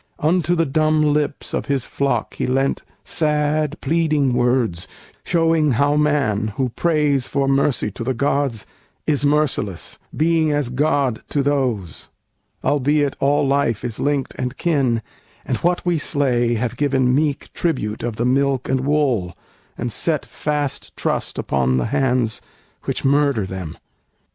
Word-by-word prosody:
Unto 170 +2 +1
the 165 -1 +2
dumb 155 +2 +2
lips 150 -1 -2
of - - -2
his 140 -3 0
flock 135 -5 -1
he - - -2
lent 135 +2 +1 0.2
Sad, 150 0 0
pleading 155 -5 +1
words, 120 -8 +1 0.4
showing 165 -4 +2
how 145 +5 +2
man, 145 -9 +1
who 130 -2 0
prays 150 -2 +1
For 140 -1 0
mercy 135 -5 +1
to 115 - -6
the 130 +2 -1
gods, 135 -3 0 0.4
is 145 -2 +1
merciless, 145 - 0 0.2
Being 160 0 +2
as 145 -4 0
god 135 -2 +1
to 145 - 0
those; 125 - -1 0.5
albeit 145 0 +1
all 140 +1 +2
life 135 -6 +1
Is 115 -3 -4
linked 145 -2 0
and 125 +1 -3
kin, 135 -9 +1 0.4
and - - -1
what 175 +1 0
we 175 -2 +1
slay 125 -6 +1
have 120 +1 -2
given 130 -3 +2
Meek 145 0 0
tribute 120 -11 -2
of 120 -2 -3
the 120 - -1
milk 135 0 +1
and 130 0 +1
wool, 135 -10 0 0.4
and 120 0 -3
set 155 +6 0
Fast 150 -2 -3
trust - - -2
upon 65 -2 +1
the 65 - 0
hands 125 -4 +1 0.4
which - - -3
murder 140 -6 +2
them. 95 -4 -6
140 Hz, 145 wpm, -20 LUFS, 120-150 Hz, 0.5 s, the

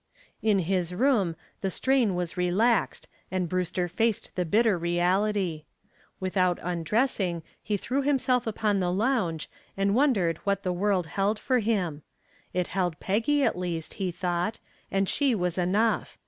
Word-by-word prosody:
In 215 -2 +3
his 180 -1 -1
room 215 -8 +2 0.2
the 195 - -1
strain 245 -1 +2
was 175 -2 -3
relaxed 195 +6 +1 0.2
and 185 -2 -1
Brewster 180 0 -1
faced 220 +5 -1
the 180 - 0
bitter 215 +4 +3
reality. 175 0 0 0.5
Without 185 -1 +1
undressing 180 0 0 0.2
he 210 - -1
threw 260 +7 -1
himself 255 -3 +1
upon 210 -2 0
the 180 -1 0
lounge 195 - 0 0.3
and 195 0 +2
wondered 210 - +2
what 200 -1 -1
the 180 - 0
world 190 -1 +1
held 195 +7 0
for 255 +3 +1
him. 190 -9 -1 0.5
It 180 -1 -1
held 180 -4 -1
Peggy 230 +9 +1
at - - +2
least, 175 -3 -4
he 190 - +1
thought, 180 +4 -2 0.3
and 195 0 +1
she 275 +1 +2
was 180 -3 -1
enough. 205 +6 +1
190 Hz, 145 wpm, -27 LUFS, 175-220 Hz, 0.5 s, In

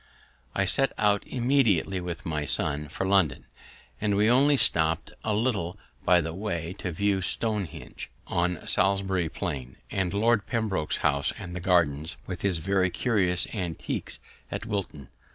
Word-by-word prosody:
I - - +2
set 135 -1 +4
out 105 -1 +2
immediately, 120 - +2
with 85 -1 -5
my 75 -3 -2
son, 75 +1 -1
for 95 - -4
London, 90 -10 +2 0.6
and 105 -1 +1
we 105 +3 +4
only 140 +3 +5
stopt 80 -7 +3
a 110 -2 0
little 105 -6 -1 0.3
by 90 0 +5
the 80 0 -4
way 85 -3 -3
to 90 - -3
view 100 +3 +1
Stonehenge 105 -2 -3 0.2
on 90 -1 -1
Salisbury 95 -3 +1
Plain, 65 -4 -5
and 90 -2 0
Lord 110 +1 +2
Pembroke's 110 -10 -1
house 70 0 +2
and 90 -2 -6
gardens, 85 -3 +1
with 90 -1 -6
his 95 -4 +2
very 95 +2 +1
curious 90 -4 +1
antiquities 90 -6 -4 0.3
at - - -4
Wilton. 100 - -4
95 Hz, 145 wpm, -27 LUFS, 85-105 Hz, 0.6 s, only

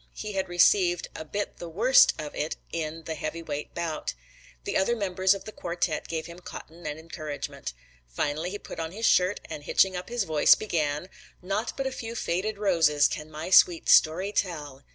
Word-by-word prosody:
He 215 - -5
had 190 -1 -2
received 175 0 +3
a - - -5
bit 205 +6 -4
the 170 - -7
worst 230 +10 +5
of 150 -1 -5
it 155 - -2 0.2
in 165 0 -4
the 160 - -4
heavyweight 155 -1 -5
bout. 165 - -3 0.5
The - - -3
other 215 +5 +2
members 190 -2 +2
of 195 - -9
the 215 - -7
quartet 175 -4 -2
gave 160 -1 -3
him 170 +2 -10
cotton 170 -2 -9
and 150 0 -4
encouragement. 155 - -6 0.3
Finally 145 - -2
he 205 - -5
put - - -9
on 165 +1 -4
his 225 +3 -2
shirt 185 +3 +3
and 155 -2 -6
hitching 190 +5 +3
up 180 +3 -5
his 240 -2 0
voice, 155 -4 +5
began, 155 -5 -2 0.4
"Naught 200 +5 -2
but 270 - -2
a 265 - -1
few 230 -2 -6
faded 205 +1 -1
roses 165 -8 +4
can 150 0 -6
my 155 +4 -6
sweet 175 -2 +6
story 180 +6 +5
tell." 150 -9 -3
170 Hz, 190 wpm, -27 LUFS, 155-195 Hz, 0.5 s, sweet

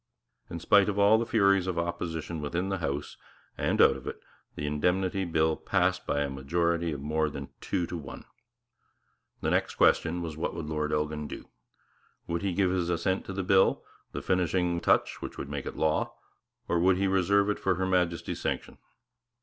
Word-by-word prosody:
In 85 - -5
spite 100 +4 +4
of 100 - -2
all 105 +2 +5
the 115 - -2
furies 100 -4 +3
of 90 -2 -2
opposition 85 -1 -3
within 85 +6 -2
the 95 -1 -2
House 70 -2 -3 0.4
and - - 0
out 70 - +6
of 65 - -10
it, - - -5 0.4
the 75 - -4
Indemnity 90 +6 0
Bill 80 -2 +1
passed 90 -1 0
by 70 - +1
a 70 - 0
majority 85 +5 0
of 70 -2 -5
more 75 +1 0
than 70 -1 -7
two 90 - -1
to 90 - -6
one. 75 -5 -8 1.2
The - - 0
next - - 0
question 85 +1 +3
was 80 -2 -5
what 80 - -3
would 80 - -4
Lord 75 -1 -2
Elgin 75 0 -1
do? - - -9 0.8
Would 85 0 -2
he 100 - 0
give 95 0 +2
his 90 -2 0
assent 90 +3 0
to 95 - -6
the 95 0 -2
bill, 95 +1 +3 0.3
the - - -5
finishing 90 -1 +1
vice - - -14
regal - - +8
touch - - -11
which - - -7
would 70 - -6
make 70 -2 -4
it - - -6
law, 80 -1 0 0.5
or 85 - +1
would 90 +1 +4
he 100 - +1
reserve 95 +1 +3
it - - -4
for 95 -1 +1
Her 95 +2 -1
Majesty's 90 -2 0
sanction? - - -3
85 Hz, 200 wpm, -28 LUFS, 75-95 Hz, 1.2 s, regal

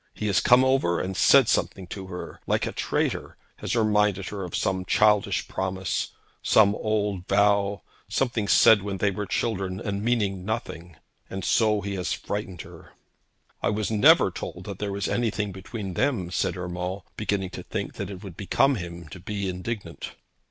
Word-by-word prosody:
He - - -4
has 100 -2 +3
come 125 +1 +5
over 130 -11 +2
and 95 +1 -3
said - - +6
something 95 - 0
to 95 -1 -7
her, 90 -1 -8
like - - +1
a - - -3
traitor, - - -2 0.2
has - - -3
reminded 105 -3 +2
her 100 -2 -5
of 90 - -5
some 95 -1 0
childish 105 +2 +2
promise, 95 0 -2 0.3
some 100 -2 +5
old 105 -4 -1
vow, 100 -1 +2 0.3
something 120 -5 0
said 105 0 +6
when 100 -1 -4
they 100 +1 +1
were 105 +1 -4
children, 95 -3 -1
and 100 0 -3
meaning 105 -6 0
nothing; 90 -6 -5 0.3
and 95 -2 -5
so 110 -2 +3
he 100 +1 -4
has 90 - -1
frightened 100 -4 -5
her.' - - -14 0.7
'I - - +1
was 105 +1 -1
never 105 -2 +6
told - - -7
that - - -7
there 105 -1 -2
was 100 0 -2
anything 110 -4 -1
between 95 +1 -6
them,' 100 -6 0
said 90 -1 -1
Urmand, 90 +2 -4
beginning 100 -3 -2
to - - -7
think - - -4
that - - -4
it 95 0 -8
would 95 -5 -9
become 135 +8 +2
him 85 -2 -7
to 90 - -9
be 100 +2 -4
indignant. 95 +4 -5
100 Hz, 175 wpm, -26 LUFS, 95-105 Hz, 0.7 s, said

